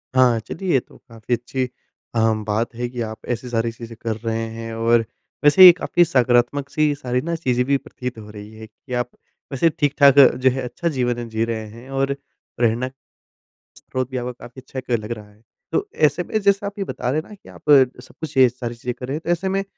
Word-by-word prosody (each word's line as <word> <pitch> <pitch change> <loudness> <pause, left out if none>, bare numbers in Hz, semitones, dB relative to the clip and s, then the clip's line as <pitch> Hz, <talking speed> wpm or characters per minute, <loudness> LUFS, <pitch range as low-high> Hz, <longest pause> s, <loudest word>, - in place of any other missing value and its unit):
हाँ, 125 -3 +5
चलिए 175 - -4
ये 135 - +5
तो - - -18
काफ़ी 115 +1 -4
अच्छी 125 +2 -1
अ, 120 -1 -9 0.3
बात 110 +3 -1
है 120 +1 -2
कि 120 -1 -5
आप 110 -1 -6
ऐसी 125 +2 -9
सारी 115 -1 0
चीज़ें 115 0 -10
कर 115 -2 -2
रहे 115 0 -3
हैं। 115 0 -6
और 115 +1 +3 0.4
वैसे 145 +6 +8
ये 180 - +13
काफ़ी 175 -1 +2
सकारात्मक-सी 140 +3 +2
सारी 125 -3 -2
ना 170 +3 -2
चीज़ें 125 -6 0
भी 140 +1 +2
प्रतीत 125 -2 -7
हो 105 -1 -10
रही 105 0 -10
है 110 - -9
कि 125 +4 -12
आप 125 -1 -1 0.4
वैसे 140 +5 +3
ठीक-ठाक 145 -2 +4
जो 130 -1 +6
है 130 +1 -2
अच्छा 125 +7 -4
जीवन 120 -4 -1
जी 110 0 0
रहे 115 -1 -3
हैं। 115 +4 -13
और 135 0 0 0.4
प्रेरणा 120 +1 +1 0.9
स्रोत 130 -1 -4
भी 130 - -3
आव 125 0 -3
काफ़ी 125 +2 -11
अच्छा 130 0 -7
क 125 -2 -1
लग 105 +2 -8
रहा 105 -3 -6
है। 105 +1 -24 0.3
तो 410 - 0
ऐसे 150 +3 +2
में 215 - -1
जैसे 200 0 +2
आप 200 +1 -6
ये - - 0
बता 125 - -3
रहे 150 +4 +1
हैं - - -18
ना 210 - -10
कि 195 - -18
आप - - -14 0.4
सब - - -17
कुछ 160 -1 -6
ये 130 -1 +8
सारी 120 -1 -6
चीज़ें 120 +1 -4
कर 125 - -6
रहे 135 - -2
हैं 155 - -4
तो - - -4
ऐसे 175 +2 0
में 195 +1 0
125 Hz, 230 wpm, -21 LUFS, 115-145 Hz, 0.9 s, ये